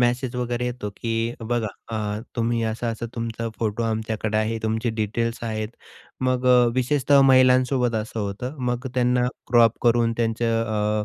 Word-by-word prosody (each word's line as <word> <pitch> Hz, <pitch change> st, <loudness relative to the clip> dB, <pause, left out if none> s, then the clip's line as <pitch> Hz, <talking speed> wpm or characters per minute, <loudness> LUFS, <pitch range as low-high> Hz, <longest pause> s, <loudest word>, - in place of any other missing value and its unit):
Message 125 Hz, +1 st, +1 dB
वगैरे 120 Hz, 0 st, -2 dB
येतो, 120 Hz, -4 st, -4 dB
की 115 Hz, 0 st, -2 dB
बघा 115 Hz, 0 st, -1 dB, 0.2 s
अ, 105 Hz, -1 st, -2 dB, 0.2 s
तुम्ही 115 Hz, 0 st, 0 dB
असं 115 Hz, +2 st, -4 dB
असा 115 Hz, +1 st, -5 dB
तुमचा 115 Hz, 0 st, -3 dB
फोटो 110 Hz, 0 st, -1 dB
आमच्याकडे 110 Hz, -1 st, -2 dB
आहे, 110 Hz, +1 st, 0 dB
तुमची 110 Hz, +2 st, 0 dB
डिटेल्स 115 Hz, +2 st, -1 dB
आहेत. 110 Hz, -1 st, -2 dB, 0.5 s
मग 130 Hz, 0 st, 0 dB
अ, 125 Hz, -1 st, +6 dB
विशेषतः 140 Hz, +2 st, +3 dB
महिलांसोबत 130 Hz, -2 st, +4 dB
असं 110 Hz, +1 st, -3 dB
होतं. 105 Hz, +8 st, -4 dB
मग 125 Hz, +1 st, -2 dB
त्यांना 125 Hz, 0 st, +2 dB, 0.2 s
क्रॉप 115 Hz, -2 st, +5 dB
करून 115 Hz, -1 st, +3 dB
त्यांचं 115 Hz, 0 st, 0 dB
अ, 105 Hz, 0 st, 0 dB
115 Hz, 150 wpm, -23 LUFS, 110-125 Hz, 0.5 s, अ